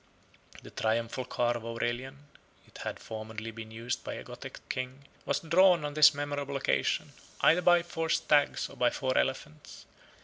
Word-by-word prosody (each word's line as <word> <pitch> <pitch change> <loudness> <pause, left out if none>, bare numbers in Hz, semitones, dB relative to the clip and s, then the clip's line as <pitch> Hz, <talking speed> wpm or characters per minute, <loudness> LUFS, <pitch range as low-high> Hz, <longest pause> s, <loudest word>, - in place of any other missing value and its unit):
The - - -11
triumphal 115 +3 -1
car 120 -1 0
of 120 - -5
Aurelian 120 +4 -4 0.4
(it - - -15
had - - -4
formerly 110 0 -7
been 110 0 -9
used 115 +2 -4
by - - -5
a - - -7
Gothic - - -10
king) 130 +2 -5 0.2
was 140 - 0
drawn, 170 0 +4
on 145 - -4
this 150 -1 +7
memorable 145 -1 -3
occasion, 135 - 0 0.3
either 165 +3 +5
by 175 -1 +5
four 165 -1 -3
stags 150 -3 +2
or - - -14
by 125 - +3
four 130 -2 -2
elephants. 150 +3 -2
135 Hz, 165 wpm, -30 LUFS, 115-150 Hz, 0.4 s, this